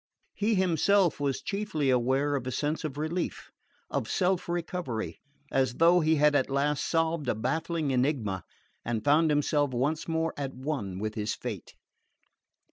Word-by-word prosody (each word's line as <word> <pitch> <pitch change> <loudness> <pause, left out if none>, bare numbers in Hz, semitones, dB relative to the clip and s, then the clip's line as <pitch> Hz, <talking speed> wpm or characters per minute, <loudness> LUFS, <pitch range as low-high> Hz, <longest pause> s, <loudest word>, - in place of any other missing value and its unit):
He 215 +2 +1
himself 185 0 +3
was 140 -2 -1
chiefly 195 -9 -1
aware 130 +4 +2
of 130 -2 -3
a - - -1
sense 150 +5 -1
of 145 -3 -4
relief, 160 +4 -3 0.4
of - - -2
self 185 -1 +1
recovery, 140 - -3 0.3
as 130 -2 +1
though 170 +4 +5
he 160 -1 +3
had 150 0 +4
at 140 -2 +2
last 140 +2 +1
solved 165 -4 0
a - - +1
baffling 160 +5 -1
enigma 125 - 0 0.4
and 115 -2 -2
found 155 +3 +4
himself 145 0 +2
once 145 +6 0
more 165 0 0
at 135 -2 -4
one 130 -9 -3
with 110 +2 -3
his 105 0 -2
fate. - - -7
145 Hz, 155 wpm, -29 LUFS, 130-165 Hz, 0.4 s, though